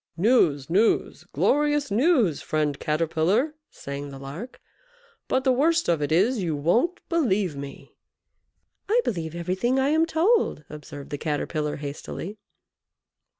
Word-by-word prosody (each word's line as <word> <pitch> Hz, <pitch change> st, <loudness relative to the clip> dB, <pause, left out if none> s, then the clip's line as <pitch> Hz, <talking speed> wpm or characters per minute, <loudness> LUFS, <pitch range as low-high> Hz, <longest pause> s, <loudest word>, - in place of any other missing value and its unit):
"News, 170 Hz, -, +3 dB
news, 200 Hz, +7 st, +1 dB
glorious 295 Hz, -3 st, +1 dB
news, 235 Hz, -, +3 dB
friend 150 Hz, -2 st, -1 dB
Caterpillar!" 165 Hz, -, +1 dB, 0.2 s
sang 140 Hz, +1 st, -7 dB
the 135 Hz, -, -9 dB
Lark; 145 Hz, -, -8 dB, 0.7 s
"but 260 Hz, -, +1 dB
the 260 Hz, -, +3 dB
worst 325 Hz, +6 st, +2 dB
of 165 Hz, -3 st, +1 dB
it 145 Hz, -, -1 dB
is, 205 Hz, +8 st, +3 dB
you 165 Hz, -4 st, -1 dB
won't 230 Hz, -, +1 dB
believe 210 Hz, -, +1 dB
me!" 140 Hz, 0 st, -9 dB, 1.0 s
"I 460 Hz, +3 st, +4 dB
believe 165 Hz, -5 st, -3 dB
everything 185 Hz, +9 st, 0 dB
I 265 Hz, +1 st, +2 dB
am 320 Hz, +2 st, +3 dB
told," 340 Hz, -, +2 dB
observed 145 Hz, -1 st, -9 dB
the 145 Hz, -, -4 dB
Caterpillar, 150 Hz, 0 st, -2 dB
hastily. 155 Hz, +7 st, -7 dB
185 Hz, 130 wpm, -25 LUFS, -, 1.0 s, I